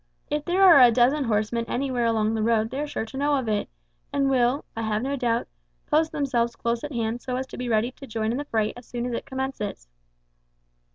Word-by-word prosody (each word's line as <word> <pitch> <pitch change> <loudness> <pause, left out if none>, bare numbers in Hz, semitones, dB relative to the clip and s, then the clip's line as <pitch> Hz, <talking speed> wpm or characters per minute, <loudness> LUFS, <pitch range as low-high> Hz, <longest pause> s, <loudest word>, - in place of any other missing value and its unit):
If 295 0 -1
there 370 +2 +2
are 340 -7 +9
a 245 - +9
dozen 255 +5 +3
horsemen 225 +1 0
anywhere 250 -1 -1
along 220 -1 +1
the 220 - -1
road 225 0 +1
they 265 - -3
are 300 - -2
sure 225 - -3
to 255 +4 -9
know 290 +1 +2
of 260 -4 -3
it, 210 -1 -1 0.4
and 275 -1 +1
will, 255 +2 +2
I 225 - -3
have 220 0 -1
no 275 +2 -1
doubt, 235 -3 0 0.4
post 315 +1 +2
themselves 245 -6 0
close 235 0 -2
at 295 - -5
hand 230 -1 -2
so 255 - -3
as 260 +1 -2
to - - -10
be 250 -1 -3
ready 225 +2 +1
to 275 +1 -12
join 220 -1 -1
in 245 - -2
the 290 - -4
fray 220 -5 0
as 245 0 -12
soon 240 0 -4
as 245 - -3
it - - -4
commences." 265 - -4
245 Hz, 235 wpm, -25 LUFS, 225-275 Hz, 0.4 s, are